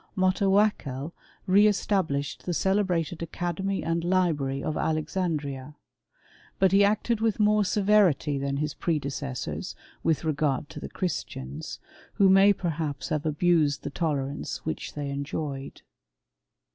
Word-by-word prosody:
Motawakkel 185 -7 +2 0.3
re 200 +3 +6
established 180 -10 -1
the 175 - 0
ce 190 +3 +2
lebrated 175 -5 0
academy 175 +3 -2
and 165 +1 0
libi*ary 160 -7 +1
of 155 -1 -2
Alexandria. 155 -4 -2 0.8
But 190 -1 +4
"C 200 +1 +6
acted 215 +2 +1
with 220 -2 +1
more 210 0 +4
severity 190 -8 +3
than 140 0 -2
his 150 +1 -2
predecessors 140 -4 -3 0.3
with 160 -1 +1
regard 150 -2 0
to - - -7
the - - -7
Christians, 75 - -4 0.4
who 195 -1 +4
may 195 +1 +7
perhaps 155 -8 -3
have 155 0 -1
abused 155 -2 +2
the - - -4
tolerance 145 -3 -3
which 160 - -4
they 145 -1 -3
enjoyed. 140 -1 -5
160 Hz, 125 wpm, -27 LUFS, 145-190 Hz, 0.8 s, may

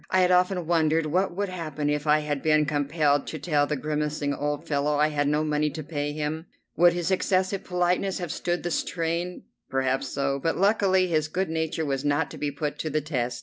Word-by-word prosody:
I 185 - +3
had 180 0 +3
often 180 -1 +2
wondered 160 -1 +2
what 180 +4 0
would 200 0 -1
happen 155 -5 -4
if 150 +1 -1
I 150 +1 +4
had 145 -2 -2
been 155 -1 +3
compelled 145 0 +1
to 155 - -4
tell 145 -1 +1
the 150 - -1
grimacing 150 0 -2
old 145 +3 -3
fellow 145 0 +1
I 150 +1 +3
had 145 -1 0
no 150 +1 +1
money 150 0 +1
to 155 +2 -6
pay 145 -1 -3
him. 155 +2 -3 0.3
Would 175 0 +5
his 175 +1 -1
excessive 190 +1 +1
politeness 180 +1 0
have 175 -4 -4
stood 175 0 -2
the 175 - -2
strain? 170 +2 -2 0.3
Perhaps 135 0 0
so, 140 +1 -1
but 165 - 0
luckily 195 -1 +3
his 155 -4 0
good 185 +4 -2
nature 160 0 -1
was 135 -1 -2
not 145 +2 +1
to - - -9
be 145 - -1
put 145 +1 -4
to 155 - -2
the 155 +1 +1
test. 125 -5 -2
155 Hz, 215 wpm, -26 LUFS, 145-175 Hz, 0.3 s, Would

